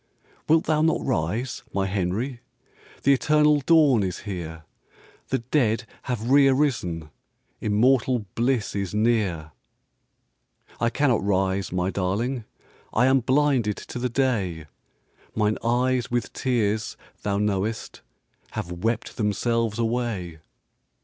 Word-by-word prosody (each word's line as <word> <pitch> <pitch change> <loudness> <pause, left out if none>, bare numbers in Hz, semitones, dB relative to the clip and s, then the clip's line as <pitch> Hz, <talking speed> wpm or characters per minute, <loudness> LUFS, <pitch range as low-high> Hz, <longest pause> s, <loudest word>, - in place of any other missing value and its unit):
"Wilt 160 +1 +5
thou 155 -1 +1
not 160 +1 +1
rise, 115 - -1
my 100 -1 0
Henry? 100 +7 -2 0.6
The 140 - +5
eternal 150 +1 +3
dawn 150 -8 +5
is 95 -2 -3
here; 85 -5 -6 0.6
The - - 0
dead 120 -2 +1 0.2
have 120 0 -2
re 140 0 +7
arisen, 110 - 0 0.5
Immortal 120 +2 +2
bliss 120 -2 0
is 100 0 -3
near." 105 -8 +1 1.3
"I 115 - +2
cannot 130 -4 +1
rise, 95 -1 0
my 90 +1 0
darling, 110 +7 -1 0.5
I 125 - +3
am 135 +1 +4
blinded 130 -4 +2
to 125 - -7
the 125 +1 -1
day. 105 - 0 0.7
Mine 105 0 +1
eyes 125 +1 +1
with 120 0 -2
tears, 110 -4 -1 0.2
thou 100 -1 -1
knowest, 105 +2 -2 0.5
Have 85 - -4
wept 110 +6 -2
themselves 115 +1 0
away." 115 -8 -2
115 Hz, 115 wpm, -25 LUFS, 100-130 Hz, 1.3 s, re